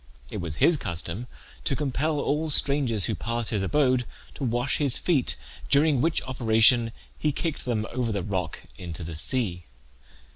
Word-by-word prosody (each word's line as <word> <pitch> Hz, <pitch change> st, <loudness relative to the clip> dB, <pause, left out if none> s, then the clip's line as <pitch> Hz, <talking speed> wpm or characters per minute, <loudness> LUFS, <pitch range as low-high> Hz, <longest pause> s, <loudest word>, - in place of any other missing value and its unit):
It -, -, -4 dB
was 80 Hz, -4 st, -4 dB
his 165 Hz, -, +4 dB
custom 85 Hz, +3 st, -5 dB, 0.4 s
to 135 Hz, -, 0 dB
compel 145 Hz, +2 st, -1 dB
all 150 Hz, +3 st, -1 dB
strangers 135 Hz, -, +4 dB
who -, -, -1 dB
passed 115 Hz, -1 st, -3 dB
his 105 Hz, -3 st, 0 dB
abode 130 Hz, +3 st, +1 dB, 0.3 s
to -, -, -7 dB
wash 120 Hz, +1 st, 0 dB
his 140 Hz, -4 st, +3 dB
feet, 150 Hz, -8 st, +1 dB, 0.3 s
during 145 Hz, -2 st, +3 dB
which 165 Hz, +1 st, +2 dB
operation 115 Hz, -1 st, +3 dB, 0.3 s
he 150 Hz, -, +1 dB
kicked 160 Hz, +2 st, -3 dB
them 110 Hz, -4 st, -1 dB
over 120 Hz, -2 st, -1 dB
the 100 Hz, -3 st, -2 dB
rock 90 Hz, -5 st, -4 dB, 0.2 s
into 85 Hz, -2 st, -5 dB
the 80 Hz, +1 st, -6 dB
sea. 90 Hz, +1 st, +1 dB
120 Hz, 160 wpm, -26 LUFS, 100-140 Hz, 0.4 s, his